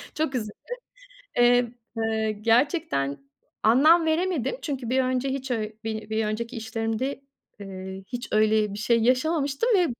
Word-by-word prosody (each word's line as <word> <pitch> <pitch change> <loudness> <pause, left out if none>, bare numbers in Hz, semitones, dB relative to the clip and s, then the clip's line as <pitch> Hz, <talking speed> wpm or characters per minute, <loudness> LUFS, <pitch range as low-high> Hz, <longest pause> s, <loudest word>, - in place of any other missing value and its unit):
Çok 305 -4 -1
üzüldüm. 215 -3 -3 0.8
Eee, 245 -1 +4 0.3
eee, 220 -1 0
gerçekten 230 - +1 0.4
anlam 310 +9 +5
veremedim 335 - 0
çünkü 265 -6 -4
bir 260 +1 +3
önce 255 +1 0
hiç 270 0 -4
ö 220 -3 -1 0.2
bir 220 -1 -4
bir 220 0 0
önceki 230 +4 -3
işlerimde, 225 +4 -3 0.4
eee, 190 -1 -7
hiç 245 +2 -6
öyle 215 -1 +3
bir 205 - -6
şey 230 +2 +2
yaşamamıştım 280 - +1
ve 360 -2 +4
240 Hz, 140 wpm, -25 LUFS, 220-275 Hz, 0.8 s, anlam